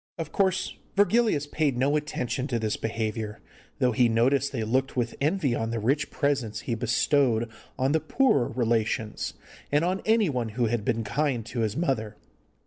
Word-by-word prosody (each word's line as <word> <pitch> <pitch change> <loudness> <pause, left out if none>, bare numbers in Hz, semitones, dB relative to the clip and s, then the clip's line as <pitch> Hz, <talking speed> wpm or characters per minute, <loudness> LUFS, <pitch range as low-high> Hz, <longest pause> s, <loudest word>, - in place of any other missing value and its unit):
Of 160 -3 -5
course, 190 -1 +1 0.2
Virgilius 205 -5 +3
paid 145 -3 0
no 140 +4 +2
attention 140 -3 -2
to 125 -4 -1
this 110 -2 -1
behaviour, 110 -1 -3 0.4
though 125 -3 +2
he 120 0 +3
noticed 130 +5 +2
they 120 -5 -2
looked 130 +4 0
with 120 -1 0
envy 150 -3 +1
on 115 -1 -1
the 115 - -2
rich 135 +7 0
presents 140 -7 -1
he 120 - -3
bestowed 120 0 +2 0.3
on 130 +2 +1
the 160 - +3
poorer 155 - +2
relations 115 -2 -1 0.4
and 145 +3 +3
on 185 +2 0
anyone 170 - +2
who 120 +3 0
had 115 -1 -1
been 115 0 0
kind 125 +1 -1
to 120 +1 -5
his 110 0 0
mother. 130 -10 -1
130 Hz, 170 wpm, -27 LUFS, 115-150 Hz, 0.4 s, Virgilius